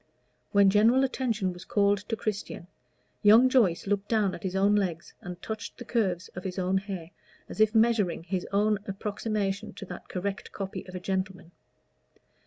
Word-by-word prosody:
When 200 -1 +5
general 230 +6 +5
attention 230 -8 -1
was 180 0 -10
called 200 0 +2
to 225 - 0
Christian 205 -5 -4 0.6
young 225 +5 +7
Joyce 215 -10 +3
looked 200 0 -1
down 210 -4 +2
at - - -7
his 190 -1 -3
own 200 +2 +4
legs 180 -5 -1
and 180 0 -7
touched 220 0 -6
the 245 - -8
curves 190 -8 0
of 180 - -8
his 185 -1 -5
own 185 +1 +1
hair, 190 -4 -7 0.4
as - - -9
if 215 +1 +4
measuring 220 -7 +3
his 180 +1 -3
own 210 +1 +2
approximation 205 0 -3
to 200 - -8
that 180 -2 -9
correct 195 +2 -4
copy 195 -1 -6
of 185 - -9
a - - -3
gentleman. 190 -2 -3
200 Hz, 175 wpm, -28 LUFS, 185-215 Hz, 0.6 s, young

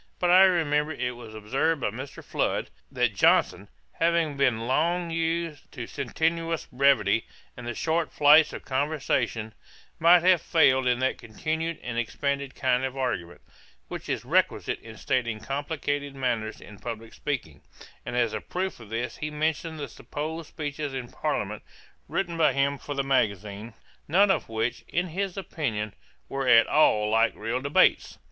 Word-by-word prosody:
But 175 -1 +2
I 185 +2 +8
remember 155 -4 +2
it 125 -3 -3
was 115 -2 -11
observed 135 +9 0
by 105 - 0
Mr. 130 +5 -8
Flood, - - -1 0.2
that - - +1
Johnson, - - +3 0.2
having 165 -3 +1
been 125 -5 +1
long 170 +6 +1
used 165 -2 -2
to 120 -4 -5
sententious 165 +5 -1
brevity 125 -5 +3 0.3
and 120 -1 -8
the 120 - -3
short 160 +3 0
flights 150 +2 +6
of - - -8
conversation, 130 -6 -1 0.5
might 170 +1 +6
have 180 -2 +5
failed 130 -5 +3
in 125 -1 +3
that 130 - 0
continued 160 +8 -3
and 120 -1 -3
expanded 140 +3 -2
kind 130 -1 +1
of 130 0 -3
argument, 95 -10 -3 0.5
which - - -7
is - - -2
requisite - - +1
in 110 -1 -12
stating 120 -4 -1
complicated 145 +2 -3
matters 120 -5 -2
in 105 -1 -13
publick 115 -1 -7
speaking; 125 - -4 0.4
and - - -5
as 120 -3 +2
a 110 - -3
proof 185 -3 -3
of 115 -3 -12
this 115 +2 -3
he 150 - -3
mentioned 155 +1 -2
the 145 - -4
supposed 155 +2 -6
speeches 145 -2 -4
in 125 -2 -5
Parliament - - -2 0.5
written 170 -3 -2
by 160 -2 +4
him 140 0 +1
for 145 - -6
the 140 - 0
magazine, 110 -4 -1 0.3
none 195 +6 +5
of 165 - -1
which, 115 +2 -2
in 175 +1 -1
his 190 +2 -3
opinion, 115 - -3 0.3
were 135 -1 -3
at 115 -2 +7
all 105 -8 +3
like 115 0 +3
real 115 +4 -2
debates. 140 +2 +3
140 Hz, 160 wpm, -27 LUFS, 115-160 Hz, 0.5 s, I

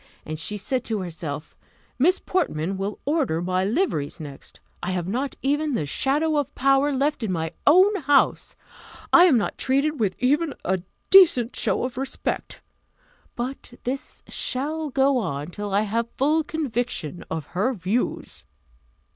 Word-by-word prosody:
And 155 0 -5
she 210 +6 -3
said 250 +5 -2
to 220 -3 -1
herself, 160 -4 -6 0.4
"Miss 355 +8 +4
Portman 195 - -1
will 195 +2 -3
order 280 - +1
my 185 +1 0
liveries 200 - -1
next! 145 -3 -10 0.2
I 175 - -3
have 180 -2 -2
not 260 +8 -2
even 290 +1 +1
the 155 - -1
shadow 295 - +1
of 290 -3 -2
power 275 +2 +3
left 280 +1 0
in 220 -4 -1
my 160 -2 -2 0.2
own 370 +7 +7
house! 285 -4 +2 0.6
I 350 - +9
am 305 -9 +5
not 210 - -2
treated 280 +3 +1
with 200 -4 +1
even 290 +5 +1
a 190 0 0 0.3
decent 315 -11 +7
show - - 0
of 250 0 -3
respect! 270 - -4 0.7
But 245 0 -5
this 265 +2 -5
shall 305 +4 -3
go 270 0 +3
on 145 -5 -4
till 205 +2 -5
I 200 +2 +3
have 230 +2 -1
full 305 +4 +2
conviction 245 - -3
of 160 -2 -3
her 200 +9 +1
views." 210 +2 -2
250 Hz, 155 wpm, -24 LUFS, 185-290 Hz, 0.7 s, I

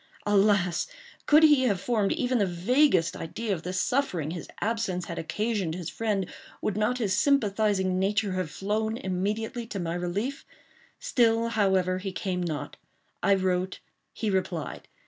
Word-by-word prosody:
Alas! 200 - +3 0.4
could 305 +2 +6
he 295 -4 +6
have 200 -6 +1
formed 215 -2 +1
even 255 -6 0
the 200 - +3
vaguest 185 - +2
idea 210 +6 -3
of 170 - -4
the 180 - -4
suffering 185 - 0
his 170 -1 -6
absence 205 -5 -1
had 170 - -5
occasioned 200 -1 -1
his 175 -3 -5
friend, 210 -4 -1 0.3
would 210 - -1
not 215 +4 +1
his 205 -6 0
sympathizing 205 -7 +2
nature 200 +1 +1
have 185 -3 -2
flown 215 +6 -1
immediately 215 +5 -2
to 200 - -5
my 170 -2 -2
relief? 195 +10 -3 0.5
Still, 230 - +2
however, 190 -4 +2
he 190 0 -4
came 185 -1 -2
not. 155 -5 -4 0.4
I 200 +2 +4
wrote. 185 -1 -1 0.3
He 215 -2 -2
replied. 180 -4 -2
200 Hz, 150 wpm, -27 LUFS, 185-225 Hz, 0.5 s, could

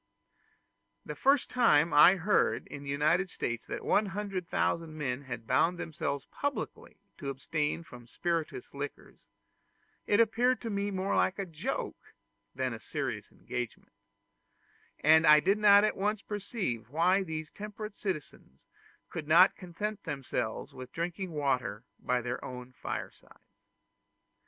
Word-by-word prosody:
The - - -5
first 275 0 +3
time 170 -11 +4
I 150 +6 +8
heard 195 +3 +2
in 145 - -8
the 140 - -8
United 155 +7 +2
States 120 -8 -4
that - - -5
100,000 190 -5 0
men 135 -3 -2
had 120 -3 -6
bound 165 +9 +2
themselves 140 -4 -3
publicly 285 0 -4 0.2
to 140 -5 -4
abstain 150 +4 -2
from 120 -6 -13
spirituous 165 -2 -3
liquors, 140 0 -8 0.8
it 205 - +3
appeared 240 +3 +3
to 230 - -4
me 200 0 -1
more 195 0 -1
like 185 - +2
a 195 - -2
joke 160 -4 -5 0.4
than 130 -1 -1
a 115 - -7
serious - - -4
engagement; 120 -4 -6 1.1
and 160 +1 +6
I 150 0 +9
did 195 +6 +2
not 205 -1 +7
at 215 - +2
once 210 +2 -1
perceive 200 - -3
why 175 +7 +3
these 160 -4 -5
temperate 210 0 -7
citizens 155 - -6 0.5
could 155 -2 -5
not 170 +4 +7
content 200 +3 -5
themselves 125 -5 -3
with 130 -1 -9
drinking 175 +2 -3
water 130 -8 -1 0.2
by 125 0 0
their 120 +1 -4
own 125 0 -7
firesides. - - -8
165 Hz, 135 wpm, -31 LUFS, 140-200 Hz, 1.1 s, I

